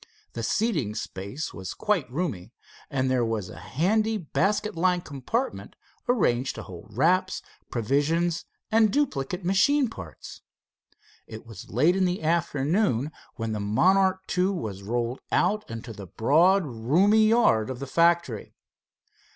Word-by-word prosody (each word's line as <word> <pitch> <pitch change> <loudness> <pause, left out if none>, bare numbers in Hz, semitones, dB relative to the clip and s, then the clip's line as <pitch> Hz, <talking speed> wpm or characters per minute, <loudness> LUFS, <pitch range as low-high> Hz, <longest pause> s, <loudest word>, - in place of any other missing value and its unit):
The 115 - -4
seating 150 - 0
space 100 +7 -5
was 95 +1 -6
quite 190 - 0
roomy, 125 - -3 0.4
and 130 -3 0
there 130 -2 +2
was 110 -5 -2
a - - -10
handy 215 +9 +1
basket 205 +4 -1
like 180 +1 +1
compartment, 155 - -3 0.3
arranged 130 - +1
to 110 - -7
hold 95 +4 -12
wraps, 185 +6 +2 0.3
provisions 150 +9 0 0.3
and 220 -1 +4
duplicate 180 - -1
machine 240 +9 +3
parts. 80 -6 -10 0.9
It 110 0 -9
was 115 -5 -11
late 155 - +3
in 190 -1 +2
the 180 -2 -1
afternoon 155 - +1 0.2
when 115 -1 -3
the 105 - -2
Monarch 185 - +3
II 180 0 +3
was 110 - -3
rolled 120 +4 -2
out 215 +1 +1
into 115 +1 -7
the 100 -2 -9
broad 170 - +3
roomy 170 - +3
yard 215 - +3
of 130 - -4
the 140 - -5
factory. 170 -6 +1
155 Hz, 135 wpm, -26 LUFS, 115-190 Hz, 0.9 s, and